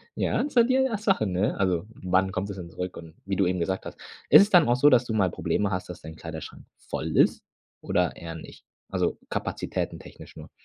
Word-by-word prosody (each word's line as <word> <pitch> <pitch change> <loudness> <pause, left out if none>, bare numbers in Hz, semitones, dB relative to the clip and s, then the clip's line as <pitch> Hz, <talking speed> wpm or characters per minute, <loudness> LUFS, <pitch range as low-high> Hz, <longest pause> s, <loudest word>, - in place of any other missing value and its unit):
Ja, - - 0
so 240 -4 +5
die, 255 +2 +2
äh, 265 -4 +2
Sache, 195 - +1
ne? 95 +1 0
Also, 90 -2 0
wann 95 0 +1
kommt 95 +1 -3
es 100 - -6
denn 85 -2 -8
zurück? 90 +2 -6
Und 80 -1 -11
wie 95 0 -2
du 95 - +2
eben 90 0 -1
gesagt 95 +2 -2
hast - - -8 0.3
ist - - +10
es 205 - -2
dann 175 - +6
auch 120 - +3
so, 145 +4 +5
dass 125 -2 +4
du 110 - -3
mal 95 -5 +2
Probleme 105 -1 -1
hast, 90 -1 -3
dass 90 - -8
dein 80 0 -9
Kleiderschrank 80 -1 -8
voll - - -5
ist - - +3 0.4
oder - - 0
eher 80 -1 -8
nicht? 80 - -12 0.2
Also - - -1
Kapazitäten - - -3
technisch - - -13
nur. - - -11
95 Hz, 225 wpm, -26 LUFS, 90-125 Hz, 0.4 s, ist